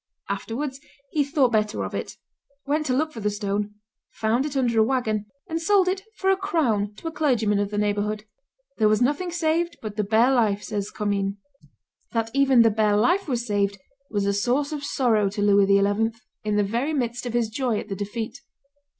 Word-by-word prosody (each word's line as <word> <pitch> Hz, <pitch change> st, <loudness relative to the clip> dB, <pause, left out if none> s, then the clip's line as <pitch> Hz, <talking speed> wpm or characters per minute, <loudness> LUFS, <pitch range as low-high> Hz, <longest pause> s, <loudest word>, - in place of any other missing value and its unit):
Afterwards 260 Hz, +7 st, -3 dB, 0.3 s
he 300 Hz, -, +2 dB
thought 280 Hz, -3 st, +2 dB
better 215 Hz, -1 st, 0 dB
of -, -, -7 dB
it; -, -, -5 dB, 0.5 s
went 300 Hz, +2 st, 0 dB
to 255 Hz, -, +1 dB
look 310 Hz, +3 st, 0 dB
for 230 Hz, -, -8 dB
the 210 Hz, -1 st, 0 dB
stone, 205 Hz, 0 st, -2 dB, 0.3 s
found 235 Hz, +6 st, 0 dB
it 285 Hz, -2 st, -4 dB
under 240 Hz, -4 st, +2 dB
a -, -, +7 dB
wagon, 220 Hz, -4 st, 0 dB, 0.2 s
and 325 Hz, 0 st, -2 dB
sold 385 Hz, +2 st, +3 dB
it 380 Hz, +1 st, 0 dB
for 385 Hz, 0 st, +2 dB
a -, -, +4 dB
crown 255 Hz, -, 0 dB
to 325 Hz, -, -8 dB
a -, -, -2 dB
clergyman 240 Hz, -10 st, +1 dB
of 205 Hz, -1 st, 0 dB
the 210 Hz, -, -4 dB
neighborhood. 210 Hz, +1 st, -1 dB, 0.5 s
"There 215 Hz, -, +5 dB
was 215 Hz, 0 st, +3 dB
nothing 290 Hz, +9 st, +1 dB
saved 340 Hz, 0 st, 0 dB
but 215 Hz, -1 st, -7 dB
the 210 Hz, -, +1 dB
bare 225 Hz, +5 st, +4 dB
life," 215 Hz, -5 st, +2 dB
says 205 Hz, -2 st, -3 dB
Commynes. 200 Hz, -2 st, -1 dB, 0.8 s
That 225 Hz, -1 st, -1 dB
even 270 Hz, -3 st, +5 dB
the 225 Hz, -, +4 dB
bare 210 Hz, -1 st, +2 dB
life 355 Hz, -, +2 dB
was 240 Hz, -4 st, -1 dB
saved 200 Hz, -2 st, 0 dB, 0.3 s
was 205 Hz, -2 st, -1 dB
a 200 Hz, -, +1 dB
source 250 Hz, +8 st, 0 dB
of 295 Hz, -2 st, -4 dB
sorrow 225 Hz, -8 st, +2 dB
to 205 Hz, +1 st, -4 dB
Louis 200 Hz, -1 st, +5 dB
XI. 205 Hz, +3 st, +2 dB, 0.3 s
in 210 Hz, -1 st, 0 dB
the 205 Hz, -, +3 dB
very 235 Hz, +10 st, -1 dB
midst 245 Hz, -3 st, -2 dB
of 240 Hz, -, -4 dB
his 240 Hz, -2 st, +2 dB
joy 240 Hz, -1 st, -1 dB
at -, -, -5 dB
the 195 Hz, -, -4 dB
defeat. 220 Hz, +6 st, -5 dB
225 Hz, 200 wpm, -24 LUFS, 210-275 Hz, 0.8 s, a